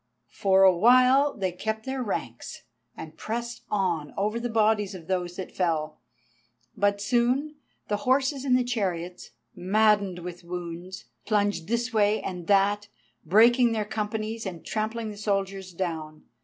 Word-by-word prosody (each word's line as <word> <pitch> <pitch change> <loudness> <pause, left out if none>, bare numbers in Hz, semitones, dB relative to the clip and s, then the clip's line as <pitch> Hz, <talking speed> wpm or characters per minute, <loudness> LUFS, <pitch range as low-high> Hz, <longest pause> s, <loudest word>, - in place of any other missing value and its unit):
For 195 +4 +3
awhile 250 +9 +5
they 190 -2 -1
kept 220 +5 -4
their 265 0 -3
ranks, 120 - -5 0.3
and 160 0 -9
pressed 235 +1 -4
on 175 -7 -1
over 210 +3 0
the 240 +1 -3
bodies 215 -3 +1
of 170 -3 -10
those 180 -1 -2
that 190 - -6
fell. 160 -4 -1 0.8
But 200 0 +1
soon 250 +8 0 0.3
the 205 - 0
horses 265 +3 +1
in 260 -3 +3
the 250 - +3
chariots, 185 -7 -3 0.3
maddened 200 0 +2
with 175 0 -8
wounds, 175 +1 -7 0.2
plunged 205 -5 0
this 235 +2 -1
way 210 0 +3
and 180 -3 -6
that, 205 +1 +3 0.4
breaking 235 +5 +5
their 215 -2 -1
companies 215 +1 -3
and 175 -3 -8
trampling 220 +1 -3
the 205 - -10
soldiers 195 -2 -2
down. 160 -4 -5
205 Hz, 140 wpm, -26 LUFS, 180-230 Hz, 0.8 s, awhile